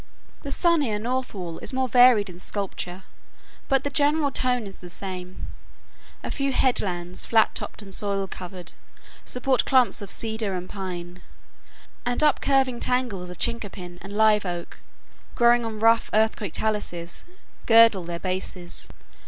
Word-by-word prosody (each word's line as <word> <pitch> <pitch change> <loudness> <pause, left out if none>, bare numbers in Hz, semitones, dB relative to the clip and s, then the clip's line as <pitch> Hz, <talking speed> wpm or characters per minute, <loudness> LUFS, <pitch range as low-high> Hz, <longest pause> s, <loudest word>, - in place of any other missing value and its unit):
The 280 - -6
sunnier 295 - +2
north 255 +4 -2
wall 175 -4 -6
is - - -2
more 260 0 0
varied 245 -3 +6
in 175 -1 -9
sculpture, 190 -1 -4 0.6
but 270 -1 +2
the 285 - -2
general 290 0 +2
tone 250 -3 0
is 195 - -10
the 180 - -11
same. 185 0 -5 0.8
A - - -4
few 275 -1 -1
headlands, 180 -9 +1
flat 225 -1 +4
topped - - -4
and 195 -1 -10
soil 200 0 -1
covered, 180 -1 -7 0.5
support 255 +1 +1
clumps 255 -4 +3
of 200 - -7
cedar 220 -3 -2
and 180 0 -5
pine; 180 -2 -7 0.8
and 245 +4 -1
up 300 -3 +3
curving 265 -3 +2
tangles 240 -8 -1
of 180 - -9
chinquapin 185 -6 -3
and 195 - -9
live 215 -1 +4
oak, 175 -2 -6 0.6
growing 240 0 +4
on 220 -1 -6
rough 230 +1 +4
earthquake 215 -4 +1
taluses, 175 -6 -3 0.4
girdle 225 -4 +6
their 170 0 -5
bases. 185 -1 -4
210 Hz, 145 wpm, -25 LUFS, 185-250 Hz, 0.8 s, varied